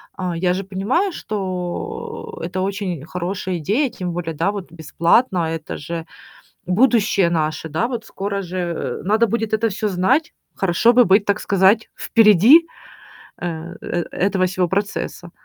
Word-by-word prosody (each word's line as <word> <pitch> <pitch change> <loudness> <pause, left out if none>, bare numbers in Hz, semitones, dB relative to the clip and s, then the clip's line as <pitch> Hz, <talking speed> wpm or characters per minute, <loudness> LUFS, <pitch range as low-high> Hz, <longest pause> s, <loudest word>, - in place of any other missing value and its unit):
а, 180 -3 -3
я 180 +1 +1
же 195 +2 -3
понимаю, 225 - 0
что 185 -4 -5
это 185 +2 -3
очень 190 -6 -3
хорошая 180 +2 -3
идея, 235 - +1
тем 180 -5 -5
более, 165 -2 -4
да, 170 +6 +1
вот 195 -5 -7
бесплатно, 170 - +1
а, - - -2
это 160 -1 -5
же 165 +2 -5 0.6
будущее 205 -2 +3
наше, 160 -1 -1
да, 160 +11 -1
вот 235 -4 -5
скоро 200 0 -3
же, 185 +1 -6
э, 170 -8 -3
надо 220 +4 +3
будет 225 0 -2
это 225 +1 +1
всё 210 +2 -2
знать. 250 - +1 0.2
Хорошо 195 +6 +3
бы 245 0 +6
быть, 195 +2 +4
так 205 - 0
сказать, 200 +2 +3
впереди, 225 - +6 0.7
а, - - -6 0.4
э, 175 -1 -2
этого 190 0 +1
всего 180 -1 0
процесса. 195 -3 -3
190 Hz, 155 wpm, -20 LUFS, 175-215 Hz, 0.7 s, бы